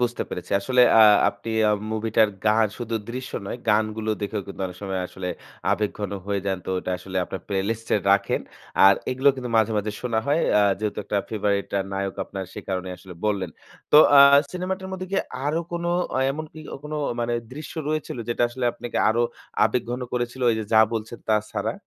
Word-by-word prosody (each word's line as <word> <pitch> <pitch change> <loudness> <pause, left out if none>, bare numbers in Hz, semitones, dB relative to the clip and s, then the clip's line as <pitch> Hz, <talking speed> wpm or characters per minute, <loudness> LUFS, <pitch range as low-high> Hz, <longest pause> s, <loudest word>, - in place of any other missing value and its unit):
বুঝতে 120 -1 0
পেরেছি। 90 - -7
আসলে 125 +5 +3 0.2
আ - - +9 0.3
আপনি 105 +3 -6 0.2
আ - - +4 0.2
মুভিটার 110 0 +2 0.2
গান 110 +1 +4
শুধু 115 -1 -4 0.2
দৃশ্য 130 +1 -6
নয়, - - -4
গানগুলো 110 +1 +1
দেখেও 105 0 -3
কিন্তু 100 - -9
অনেক 90 - -9
সময় 95 -2 -2
আসলে 90 -1 -6 0.4
আবেগঘন 105 -1 -1 0.2
হয়ে 100 -1 -1
যান। 95 -1 0
তো - - -9
ওটা 90 - -4
আসলে 95 0 -7
আপনার 95 - -6
playlist 105 +3 -2
এ - - +5
রাখেন। 100 - +2 0.5
আর 100 - +8 0.2
এগুলো 130 +2 +3
কিন্তু 125 -2 -5
মাঝে, 110 0 +3
মাঝে 105 +1 -2
শোনা 115 -3 0
হয়। 150 +4 +2 0.2
আ - - +5 0.2
যেহেতু 105 -1 -3
একটা 105 - -2
favorite 100 -2 0
আ - - +1
নায়ক 95 0 -2
আপনার 95 -1 -6
সে - - -8
কারণেই 95 -1 -3
আসলে 95 -2 -12
বললেন। 100 -5 0 0.4
তো - - +9 0.2
আ - - +10 0.3
সিনেমাটার 190 +1 -3
মধ্যে 185 0 -5
কি - - +1 0.3
আরো 160 +3 +1
কোন 170 0 -3 0.4
এ - - +3
এমন 155 +3 -5
কি 155 - -10 0.2
কোন 150 - -7 0.3
মানে 120 0 -1 0.2
দৃশ্য 150 +2 -8 0.2
রয়েছিল? 155 -4 -2
যেটা 120 - 0
আসলে 125 +1 -4
আপনাকে 120 - -4
আরো 115 +2 +2 0.4
আবেগঘন 120 0 -1
করেছিল 120 +1 -2
এই - - -1
যে 110 - -4
যা 110 - +7
বলছেন 115 +1 -4
তা 110 - +4 0.2
ছাড়া? - - -2
110 Hz, 195 wpm, -24 LUFS, 100-125 Hz, 0.5 s, আ